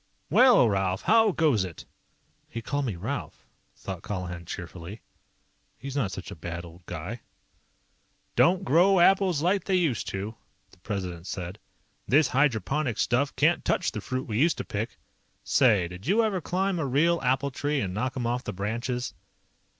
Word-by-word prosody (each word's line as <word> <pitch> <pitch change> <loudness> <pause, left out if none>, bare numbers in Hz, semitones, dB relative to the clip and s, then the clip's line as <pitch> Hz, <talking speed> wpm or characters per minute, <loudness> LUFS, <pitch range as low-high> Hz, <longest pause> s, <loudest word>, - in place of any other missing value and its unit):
"Well, 250 - +6
Ralph 95 -2 0
how 220 -1 +5
goes 150 - +2
it?" 90 -4 -8 0.6
He 115 - -5
called 145 +4 -2
me 110 -7 -2
Ralph, 85 - -5 0.3
thought - - -7
Colihan 90 -3 -5
cheerfully. 90 +3 -7 0.8
He's 135 0 -7
not 120 -9 0
such 95 -2 -7
a - - -7
bad 85 +1 -6
old 85 +1 -14
guy. 90 +8 -6 1.1
"Don't 185 +2 +4
grow 185 +3 +4
apples 185 -3 +4
like 190 +3 +1
they 190 - +1
used 160 - +1
to," 100 +3 -4 0.4
the 95 - -21
President 90 -3 -5
said. 90 +2 -5 0.5
"This 145 +1 +4
hydroponic 135 0 +1
stuff 135 +2 +1
can't - - +3
touch - - +1
the - - -5
fruit 130 0 -4
we 110 -1 -1
used 165 +4 +3
to - - -4
pick. 105 +3 -4 0.5
Say, 105 -10 +3
did 90 +7 -10
you 215 +6 +4
ever 200 -5 0
climb 185 +2 -1
a 145 - -1
real 165 +6 +2
apple 135 +2 +1
tree 145 +2 -1
and 95 -7 -2
knock 130 +7 -2
'em 120 - -2
off 120 +2 -1
the - - -5
branches?" 120 +6 -3
125 Hz, 165 wpm, -27 LUFS, 95-155 Hz, 1.1 s, Well